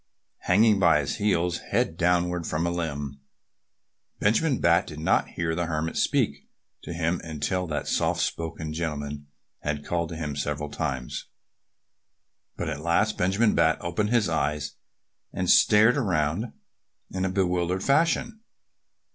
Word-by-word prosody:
Hanging 105 Hz, +2 st, +4 dB
by 85 Hz, -5 st, +5 dB
his 70 Hz, -, -3 dB
heels 90 Hz, -5 st, +1 dB
head 80 Hz, -, -1 dB
downward 90 Hz, 0 st, +1 dB
from 80 Hz, +3 st, -1 dB
a 85 Hz, -, 0 dB
limb, 70 Hz, -5 st, -4 dB, 1.0 s
Benjamin 125 Hz, +7 st, +2 dB
Bat 85 Hz, 0 st, +3 dB
did 75 Hz, -1 st, -8 dB
not 80 Hz, -, +2 dB
hear 85 Hz, -1 st, -2 dB
the 85 Hz, 0 st, -1 dB
Hermit 80 Hz, 0 st, -2 dB
speak -, -, 0 dB, 0.3 s
to -, -, -8 dB
him 85 Hz, +1 st, -1 dB
until 85 Hz, +3 st, -2 dB
that 75 Hz, -3 st, -3 dB
soft -, -, +1 dB
spoken 80 Hz, -1 st, -3 dB
gentleman 75 Hz, -3 st, -4 dB, 0.3 s
had 75 Hz, -1 st, -3 dB
called 85 Hz, -1 st, -1 dB
to 85 Hz, -, -6 dB
him 75 Hz, -3 st, -4 dB
several 75 Hz, +1 st, -3 dB
times. 65 Hz, -3 st, -3 dB, 1.3 s
But -, -, -3 dB
at 70 Hz, -, -4 dB
last 85 Hz, +6 st, +1 dB
Benjamin 100 Hz, +5 st, +2 dB
Bat -, -, +3 dB
opened 105 Hz, +5 st, -1 dB
his 115 Hz, -3 st, +2 dB
eyes 75 Hz, -1 st, -1 dB, 0.6 s
and -, -, -2 dB
stared 110 Hz, +5 st, +5 dB
around 90 Hz, -, 0 dB, 0.6 s
in 95 Hz, 0 st, -2 dB
a 95 Hz, -, +1 dB
bewildered 90 Hz, -1 st, 0 dB
fashion. 165 Hz, +9 st, +1 dB
85 Hz, 140 wpm, -26 LUFS, 75-95 Hz, 1.3 s, by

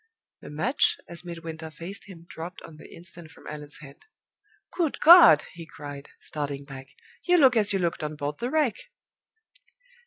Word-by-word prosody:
The -, -, -10 dB
match, 160 Hz, -, +1 dB
as 170 Hz, 0 st, -6 dB
Midwinter 165 Hz, -2 st, -7 dB
faced 170 Hz, +5 st, -8 dB
him, 170 Hz, -4 st, -13 dB
dropped 170 Hz, +2 st, -8 dB
on 160 Hz, -2 st, -12 dB
the -, -, -14 dB
instant 170 Hz, -1 st, -10 dB
from -, -, -18 dB
Allan's 150 Hz, -1 st, -7 dB
hand. 140 Hz, -2 st, -14 dB, 0.7 s
"Good 335 Hz, -5 st, -1 dB
God!" 330 Hz, -, +9 dB
he 165 Hz, -1 st, -10 dB
cried, 145 Hz, -2 st, -10 dB
starting 140 Hz, -2 st, -5 dB
back, 135 Hz, -1 st, -10 dB, 0.3 s
"you 355 Hz, 0 st, +3 dB
look 265 Hz, -6 st, +5 dB
as 210 Hz, -2 st, +3 dB
you 195 Hz, -, +1 dB
looked 170 Hz, -3 st, -2 dB
on 150 Hz, 0 st, -4 dB
board 145 Hz, 0 st, -5 dB
the 240 Hz, -, -2 dB
Wreck!" 290 Hz, -7 st, +1 dB
165 Hz, 165 wpm, -26 LUFS, 150-200 Hz, 0.7 s, God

